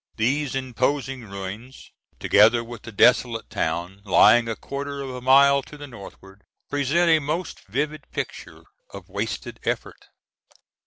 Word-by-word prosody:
These 135 +5 0
imposing 130 0 -2
ruins, 100 +7 -8 0.3
together 115 +3 +4
with 115 -2 -10
the 115 - -10
desolate 115 +1 +3
town, 90 0 -3
lying 110 +5 +5
a 115 - -2
quarter 140 +3 -6
of 135 - -6
a 125 0 -7
mile 140 +2 +5
to 150 - -13
the 145 - -8
northward, 100 -5 -13 0.3
present 145 +5 +1
a 160 - +5
most 155 +4 -4
vivid 145 +7 -3
picture - - -6 0.3
of - - -11
wasted - - -5
effort. - - -4
125 Hz, 140 wpm, -23 LUFS, 110-140 Hz, 0.3 s, lying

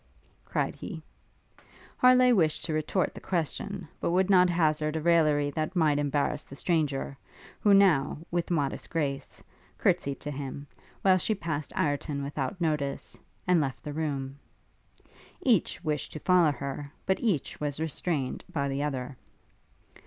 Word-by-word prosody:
cried - - -1
he. - - -7 1.0
Harleigh 255 0 +6
wished 160 -8 +2
to 160 - -2
retort 155 +4 0
the - - -10
question; 185 +2 -3
but - - -1
would 185 +3 +2
not 180 -1 +6
hazard 155 -3 +1
a - - 0
raillery 155 -3 +3
that 155 +5 -3
might 155 -4 +3
embarrass 145 0 0
the 140 - -12
stranger, 145 -4 0 0.4
who 205 - +3
now, 185 -9 +5
with 175 0 -1
modest 145 -6 -1
grace, 145 -5 -3 0.3
courtsied 140 -1 +1
to 150 - -5
him; 140 0 -6 0.4
while 185 -1 +5
she 215 +5 0
passed 155 -6 -4
Ireton 145 -1 -1
without 140 +6 -3
notice, 150 -5 -2 0.3
and 180 -3 +4
left 135 -3 -3
the 150 - -5
room. 140 -3 -3 1.0
Each 225 -7 +2
wished 150 -4 -2
to 155 - -5
follow 180 -4 +5
her, 140 +1 -5
but 190 - +1
each 200 - -1
was 145 -1 -2
restrained 160 -3 -2
by 140 -2 -1
the 135 +1 -2
other. 135 -2 -3
155 Hz, 145 wpm, -28 LUFS, 140-175 Hz, 1.0 s, Harleigh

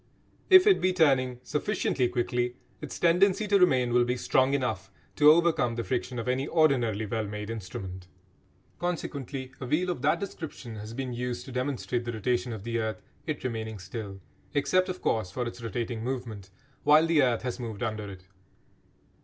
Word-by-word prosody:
If 375 -1 +9
it 405 -3 +5
be 185 0 +2
turning 130 -7 +3
sufficiently 130 -2 0
quickly 120 0 -1 0.3
its - - -6
tendency 185 +5 +3
to 200 0 +4
remain 130 -9 +3
will 120 0 +5
be 125 +1 -1
strong 130 +2 +2
enough 125 -5 -2 0.3
to 150 - +7
overcome 160 -7 +4
the 115 - -2
friction 125 +3 -2
of 115 - -4
any 130 +3 0
ordinarily 125 -11 +2
well 110 0 -2
made 105 +1 -5
instrument. 95 -3 -7 0.7
Consequently 140 -6 -4
a 130 - -4
wheel 175 +7 +1
of 150 - -5
that 155 +4 +2
description 160 - -7
has 110 +2 -8
been 130 -1 -3
used 125 0 -4
to 135 - -9
demonstrate 125 -2 -2
the 120 - -3
rotation 120 +3 -1
of 110 -4 -6
the 115 +1 -2
earth, 110 -1 -3 0.2
it 155 -4 -3
remaining 110 -3 -3
still 95 +1 -7 0.4
(except, 185 +6 +2
of 185 0 -5
course, 110 -5 0
for 120 +7 -3
its 120 0 -7
rotating 115 0 -3
movement) 115 -6 -5 0.3
while 150 +2 +6
the 165 -3 +4
earth 125 -3 +1
has 125 0 -3
moved 115 -3 -5
under 110 -3 -3
it. 95 -2 -11
125 Hz, 180 wpm, -28 LUFS, 115-145 Hz, 0.7 s, If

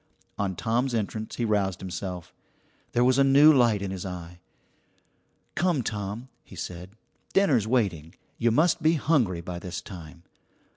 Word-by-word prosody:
On 95 -2 -1
Tom's 120 +6 0
entrance 110 0 -3
he 120 - -1
roused 100 -4 0
himself. 90 -2 -6 0.6
There 120 - +3
was 130 +2 +3
a - - +6
new 140 +3 +7
light 120 -7 +3
in 95 - -3
his 95 -2 -5
eye. 90 -2 -7 1.1
"Come, 175 -7 +1
Tom," 105 +3 -4 0.2
he - - -14
said, 90 +3 -7 0.4
"dinner's 140 - +3
waiting. 95 -9 0 0.2
You 120 - +3
must 160 +8 +2
be 160 +1 +4
hungry 125 - +1
by 85 0 -6
this 90 0 -5
time." 85 -2 -11
105 Hz, 150 wpm, -26 LUFS, 90-130 Hz, 1.1 s, new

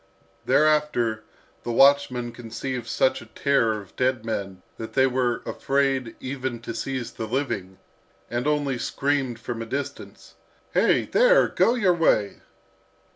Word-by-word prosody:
Thereafter 150 -8 +2 0.4
the 120 - -4
watchmen 130 -2 +4
conceived 120 +1 -6
such 130 - +1
a 120 - -13
terror 115 -3 +1
of 100 - -17
dead 130 -3 0
men 95 -4 -4
that 110 - -7
they 130 -1 +4
were 125 -2 0
afraid 135 -3 0
even 130 -2 -4
to 115 - -6
seize 130 +1 -4
the 110 - -6
living, 105 -7 -3 0.5
and 120 +3 -2
only 145 -4 0
screamed 135 -2 -1
from 115 0 -5
a - - -4
distance. 140 +3 -6 0.4
"Hey, - - +3
there! - - +4
go 235 - +2
your 200 -7 +3
way!" 135 -12 +1
130 Hz, 135 wpm, -24 LUFS, 115-140 Hz, 0.5 s, watchmen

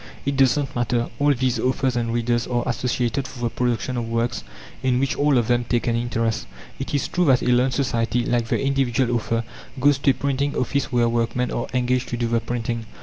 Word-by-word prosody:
It 140 0 0
does 135 +1 +4
not 140 -2 -3
matter: 120 -1 0
all 145 0 +4
these 130 0 0
authors 130 0 0
and 115 -1 -1
readers 120 0 0
are 120 -1 0
associated 125 +1 -1
for 130 -2 -10
the 120 - +1
production 125 +1 -1
of 115 -1 -2
works 115 0 -1 0.4
in 125 -1 +2
which 135 0 0
all 145 -2 +3
of 120 -2 +1
them 120 0 +2
take 120 0 -1
an 115 - +1
interest. 115 - -1 0.3
It 135 +2 -3
is 140 - 0
true 180 0 +1
that 130 -4 +4
a 125 - +3
learned 125 +1 +2
society, 120 -3 0
like 120 -2 0
the - - 0
individual 135 -3 +1
author, 115 0 -1 0.4
goes 140 +1 +4
to 140 - +2
a - - +5
printing 140 +1 -1
office 140 +2 -1
where 120 -1 +3
workmen 115 +1 0
are 120 - -2
engaged 125 0 +1
to 120 - -3
do 120 - -1
the 115 0 +1
printing. 115 -1 -3
125 Hz, 220 wpm, -23 LUFS, 120-130 Hz, 0.4 s, a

